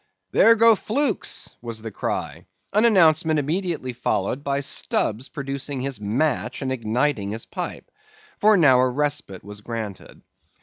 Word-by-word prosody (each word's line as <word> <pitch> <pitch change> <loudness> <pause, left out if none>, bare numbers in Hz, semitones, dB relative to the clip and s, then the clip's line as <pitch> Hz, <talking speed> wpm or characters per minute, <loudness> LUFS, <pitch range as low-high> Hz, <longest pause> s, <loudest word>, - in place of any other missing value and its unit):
"There 230 +1 +6
go 230 0 +6
flukes!" 240 +2 -2
was 115 -2 -6
the 110 - -6
cry, 95 - -4 0.3
an 210 +3 +4
announcement 160 -7 +4
immediately 155 -3 -2
followed 115 +3 -2
by 140 -1 -1
Stubb's 125 -2 -1
producing 140 0 -4
his 135 -3 -3
match 125 +3 -1
and 130 - -2
igniting 115 -2 -1
his 110 +2 -5
pipe, - - -6 0.5
for 215 0 +5
now 135 -7 +5
a 130 0 +3
respite 145 -8 -2
was 105 +1 -10
granted. 110 -4 -7
135 Hz, 140 wpm, -23 LUFS, 115-160 Hz, 0.5 s, There